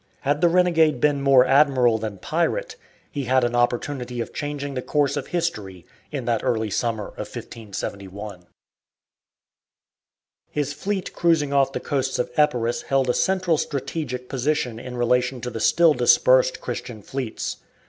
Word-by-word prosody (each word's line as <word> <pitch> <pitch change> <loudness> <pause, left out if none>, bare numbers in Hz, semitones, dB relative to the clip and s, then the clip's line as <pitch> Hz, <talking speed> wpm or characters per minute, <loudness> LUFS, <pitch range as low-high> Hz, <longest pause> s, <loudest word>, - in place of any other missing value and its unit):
Had 145 +2 0
the 175 - +5
renegade 165 -5 +3
been 145 0 +2
more 135 -2 +6
admiral 130 -4 +4
than 105 -2 -5
pirate, 170 - -1 0.4
he 140 -2 -3
had 130 +1 +3
an 120 0 0
opportunity 120 +1 -1
of 115 - -4
changing 145 -1 -4
the 130 - -3
course 145 0 0
of 145 -2 -4
history 105 - -3 0.3
in 140 -5 -4
that 115 -2 0
early 110 -2 0
summer 110 0 -1
of - - -7
1571. 100 -3 -7 2.0
His 145 -1 -2
fleet 190 +5 -3
cruising 160 -5 +2
off 135 -1 +3
the - - -3
coasts 135 -2 -1
of 125 - -2
Epirus 120 -6 +1
held 135 -2 +1
a - - -2
central 185 -2 +1
strategic 130 -3 -4
position 130 -3 -1
in 125 +1 -7
relation 125 +1 +1
to 125 - -4
the 115 - -5
still 165 +6 +4
dispersed 130 0 +4
Christian 120 -3 -6
fleets. 130 -2 -4
130 Hz, 150 wpm, -23 LUFS, 120-150 Hz, 2.0 s, more